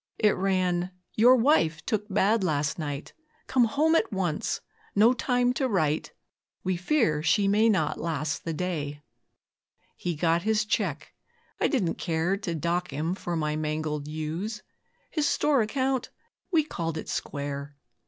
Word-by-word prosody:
It 210 -2 +3
ran, 185 -2 +1 0.2
'Your 245 +4 +6
wife 225 - +2
took 215 -2 -1
bad 205 +2 +2
last 150 -3 0
night; 145 -2 -5 0.3
Come 255 -2 +3
home 300 +8 +2
at 330 - +2
once 180 -6 -1 0.4
no 220 +5 +6
time 245 -1 +1
to 265 +1 0
write, 155 -7 0 0.5
We 185 0 0
fear 180 - +1
she 180 +6 +3
may 215 +3 +4
not 155 -7 +1
last 155 -2 -2
the 165 - -3
day.' 150 -4 -3 0.9
He 175 -2 -3
got 165 +2 +2
his 215 +2 +1
cheque 180 -8 -2 0.5
I - - +3
didn't 205 - 0
care 165 +3 0
To 190 -4 -4
dock 170 +2 -1
him 155 +5 -2
for 175 -2 -4
my 150 -2 -1
mangled 155 -1 -2
ewes; 160 +8 -4 0.5
His 305 -3 +1
store 290 -4 +3
account 260 +4 0 0.4
we 325 -3 +4
'called 165 - -4
it - - -6
square'. 140 0 -4
180 Hz, 150 wpm, -27 LUFS, 155-220 Hz, 0.9 s, Your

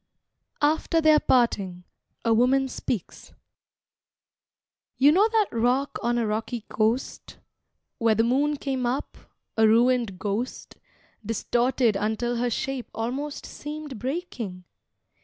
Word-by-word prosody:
AFTER 315 +2 +2
THEIR 310 -1 +5
PARTING 195 -10 +1 0.4
(A 230 - +4
Woman 260 +4 +3
Speaks) 235 -6 -5 1.6
You 280 +3 +6
know 400 +7 +4
that 440 -2 +3
rock 245 +4 0
on 240 +1 0
a 235 - +1
rocky 220 +2 -2
coast, 225 +4 -1 0.6
Where 225 -1 +3
the 225 - +3
moon 285 +5 +1
came 265 -3 -2
up, 255 +4 -3 0.4
a 220 -1 +5
ruined 235 -2 +3
ghost, 210 +6 -4 0.5
Distorted 235 +1 +1
until 220 +4 -1
her 245 +1 0
shape 260 +2 -3
almost 265 +6 -4
Seemed 295 -4 -7
breaking? 245 - -4
245 Hz, 115 wpm, -25 LUFS, 225-275 Hz, 1.6 s, You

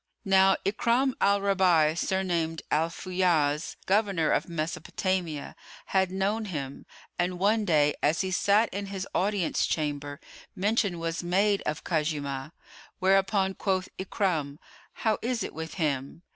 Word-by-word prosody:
Now 195 0 +5
Ikrimah 235 +6 +2
al 200 0 +3
Raba'í, 180 -6 +3
surnamed 170 -3 -1
Al 160 +2 +2
Fayyáz, 170 -5 0
governor 195 -5 +2
of - - 0
Mesopotamia,[FN#101] 170 0 -2 0.3
had 190 -1 +1
known 200 +4 -1
him, 140 -8 -6 0.3
and 180 +1 0
one 210 +3 +2
day, 150 -5 +3
as 155 +3 +2
he 190 -1 -2
sat 205 +5 +3
in 200 +1 -4
his 195 -1 -5
Audience 195 -3 +1
chamber, 145 -2 -2 0.4
mention 200 -2 +1
was 165 0 -3
made 195 +3 +2
of 150 - -3
Khuzaymah, 150 -4 -2 0.5
whereupon 195 +1 +2
quoth 190 -1 -1
Ikrimah, 170 -7 -1 0.5
"How 220 -1 +2
is 240 -1 -1
it - - -6
with 160 0 -6
him?" 150 -1 -2
185 Hz, 130 wpm, -28 LUFS, 155-195 Hz, 0.5 s, Now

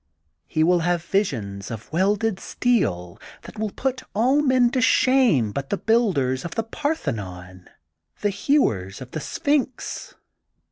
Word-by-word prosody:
He 155 - +1
will 175 +2 +4
have 175 0 0
visions 105 - -2
of 115 +5 -8
welded 200 +3 +1
steel 95 - -1 0.2
that 215 - -11
will 215 -1 -1
put 255 +4 -2
all 255 +7 +3
men 260 -4 +3
to 255 - 0
shame 250 - +4
but 135 +4 -4
the 200 - 0
builders 175 - +1
of 170 - -6
the 225 - 0
Parthenon, 100 - -4 0.5
the 205 - +1
hewers 110 - +1
of 130 -1 -10
the 155 - -4
Sphinx. 275 - -2
190 Hz, 140 wpm, -23 LUFS, -, 0.5 s, will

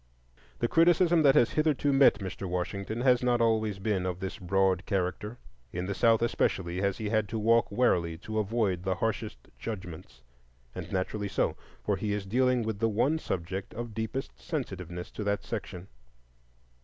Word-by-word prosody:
The 120 - 0
criticism 170 +2 +4
that 140 -3 +5
has 120 - +4
hitherto 150 -2 +2
met 135 -4 +6
Mr. 95 -2 -6
Washington 100 +5 -3
has 125 -1 +4
not 125 -1 +2
always 110 -3 +1
been 95 -2 -1
of 90 -1 -3
this 95 0 -5
broad 95 0 +1
character. 100 +3 -2 0.3
In 90 +1 -3
the 100 - -2
South 115 +4 +3
especially 95 -6 0
has 100 -1 0
he 110 -2 -3
had 110 -2 +1
to 115 - -3
walk 115 +1 +3
warily 90 -8 +2
to 110 +5 -3
avoid 105 -4 0
the 95 0 -1
harshest 110 0 -2 0.2
judgments,—and 60 - -9
naturally 100 +2 -2
so, - - 0 0.3
for 100 -2 0
he 105 +1 -2
is 105 -1 -3
dealing 125 +3 +2
with 110 -2 -3
the 115 0 +2
one 130 +9 +1
subject 95 - -4
of 120 -1 -5
deepest 110 +5 -4
sensitiveness 90 - -5
to 105 - -5
that 100 0 -1
section. 95 -5 -6
105 Hz, 165 wpm, -29 LUFS, 95-115 Hz, 0.3 s, met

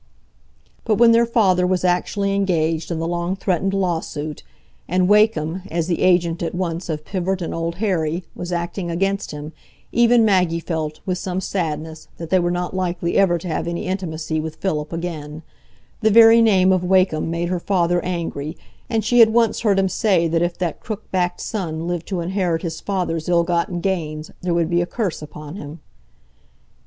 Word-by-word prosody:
But 220 - +2
when 235 +2 +6
their 230 0 +4
father 190 -6 +3
was 185 0 0
actually 195 +3 0
engaged 165 -5 0
in 170 - -2
the 165 +1 -2
long 175 +2 -1
threatened 195 0 -1
lawsuit, 160 -5 -2 0.5
and 180 +1 +2
Wakem, 190 -5 +3
as 165 0 -1
the 170 0 -1
agent 175 -2 +2
at 170 0 -3
once 175 -1 -3
of 155 -1 -3
Pivart 190 0 -2
and 170 - -4
Old 165 0 -3
Harry, 175 -4 -1
was 175 0 -6
acting 175 +1 -3
against 195 +4 -1
him, 150 +1 -7 0.4
even 235 -1 +4
Maggie 180 -5 +2
felt, 160 -2 -4
with 185 -1 -1
some 185 0 -3
sadness, 160 -4 -4
that 165 -1 -8
they 185 - +5
were 175 0 +1
not 175 +1 -2
likely 175 -2 -1
ever 190 -3 +4
to 170 - -7
have 165 0 -2
any 170 0 -3
intimacy 160 -4 -3
with 155 0 -5
Philip 155 -6 -2
again; 160 -2 -5 0.6
the 220 - +4
very 225 +1 +8
name 190 -4 +4
of 185 -1 +2
Wakem 180 -4 +2
made 170 +1 -2
her 180 -1 -1
father 175 -2 +1
angry, 165 -3 -4 0.3
and 220 -2 0
she 245 +2 +3
had 225 -1 +8
once 230 -1 +2
heard 205 -3 +2
him 195 0 +3
say 185 -3 +2
that 165 0 0
if 175 0 -1
that 175 -3 -2
crook 215 -1 -6
backed 180 -1 0
son 165 -6 -3
lived 175 -2 -3
to 185 -3 -2
inherit 175 -2 -1
his 165 -2 -4
father's 175 -5 -2
ill 170 -1 +4
gotten 175 0 -1
gains, 155 -5 -3
there 180 -2 0
would 170 -1 +2
be 175 0 +3
a 175 - -2
curse 200 -8 -3
upon 150 +2 -9
him. 150 -1 -8
175 Hz, 190 wpm, -21 LUFS, 165-190 Hz, 0.6 s, very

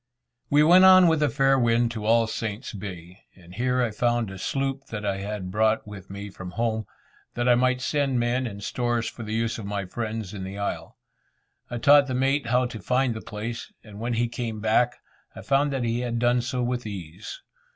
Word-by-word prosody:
We 145 +1 +5
went 180 +4 +7
on 185 -1 +8
with 160 -2 +2
a 150 - +3
fair 135 +1 +3
wind 120 0 +2
to 110 -2 -5
All 115 0 +4
Saints' 110 +2 -4
Bay, 95 -2 -8 0.2
and 90 -1 -16
here 125 +4 +1
I 115 - -1
found 120 -1 0
a 95 - -9
sloop 135 +4 -2
that 105 -2 -5
I 100 -1 0
had 100 -2 -5
brought 110 +2 +2
with 100 -2 -10
me 100 +1 -7
from 95 -1 -8
home, 110 -2 -1 0.5
that 120 +1 0
I 125 - +6
might 125 +1 +2
send 135 -2 0
men 120 +2 0
and 100 -2 -8
stores 120 0 -1
for - - -7
the 110 -1 -4
use 115 0 -1
of 100 - -6
my 100 -1 -3
friends 110 0 -5
in 95 -2 -6
the 95 +1 -6
isle. 100 0 -4 0.7
I 120 - -4
taught 140 +3 +6
the 130 - -2
mate 135 +1 +1
how 125 +2 +2
to 120 -3 -6
find 125 +4 +1
the 110 - -7
place, 115 +3 -6
and 105 -2 -12
when 120 +2 -2
he 120 +1 +1
came 115 -2 -4
back, 110 +3 +2 0.4
I - - -9
found 140 +1 +2
that 135 -2 -1
he 115 0 0
had 120 -1 -2
done 120 +1 +2
so 125 +1 -2
with 120 -1 -2
ease. 95 - -8
115 Hz, 215 wpm, -25 LUFS, 105-125 Hz, 0.7 s, on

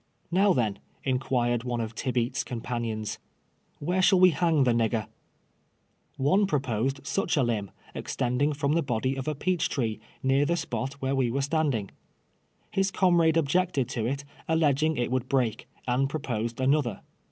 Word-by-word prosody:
" - - -17
Kow, 195 +1 +5
then," 110 -5 0 0.2
inquired 125 -2 0
one 125 -1 -2
of 115 -1 -3
Tibeats' 125 +2 -1
companions, 115 -3 -4 0.3
" - - -41
where 180 +5 0
shall 185 0 +5
we 185 0 +7
hang 160 -2 +2
the 125 - +3
nigger 115 -2 +1 0.6
?" - - -44 0.2
One 190 +10 +3
proposed 135 - -1
such 175 +1 0
a 140 - +4
limb, 110 -5 -1 0.2
extending 125 +5 0
from 140 0 0
the 165 - +3
body 130 -1 -1
of 135 +1 -5
a 155 - 0
peach 180 +4 0
tree, 115 -6 -1 0.2
near 135 +2 +3
the 170 +4 +1
spot 135 -3 -3
where 130 +1 +1
we 130 -3 +2
were 135 +3 -1
stand 150 -1 +1
ing. 100 -3 -4 0.8
His 195 0 +1
comrade 170 -4 +3
objected 160 -3 +1
to 115 -4 -2
it, 140 +2 -3 0.2
alleging 155 -1 +2
it 120 0 -1
would 130 0 -1
break, 125 -5 0 0.2
and 130 +2 +1
proposed 120 -6 -3
another. 130 -5 +1
135 Hz, 170 wpm, -27 LUFS, 120-155 Hz, 0.8 s, we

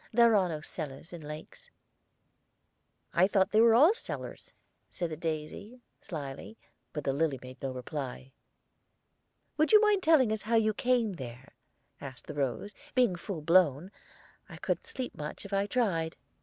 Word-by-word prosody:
"There 235 -1 +5
are 190 -3 +3
no 155 -2 -4
cellars 155 0 -7
in 170 - -7
lakes." 155 - -9 1.4
"I 180 +2 +5
thought 195 -2 +2
they 215 - +5
were 230 -1 +6
all 305 - +7
cellar," 465 - -6 0.5
said 175 -2 -4
the - - -3
daisy, 160 +9 -5 0.2
slyly; 150 +5 -7 0.3
but 150 - -4
the 135 - 0
lily 145 -1 +1
made 130 +1 -11
no 135 - -2
reply. 130 0 -6 1.3
"Would 310 +1 +3
you 425 - +10
mind 420 -2 +3
telling 305 -9 +5
us 220 -1 -1
how 225 +2 0
you 220 -1 +3
came 240 -2 +1
there?" 125 0 -9 0.5
asked 130 -2 -8
the - - -7
rose. 140 - -2 0.2
"Being 245 -8 +4
full 175 -1 -5
blown, 170 +1 +3 0.6
I - - -9
couldn't - - -2
sleep 255 -2 -5
much, 150 +6 -7
if 200 - -8
I 195 +1 +1
tried." 185 -9 0
180 Hz, 160 wpm, -30 LUFS, 150-225 Hz, 1.4 s, you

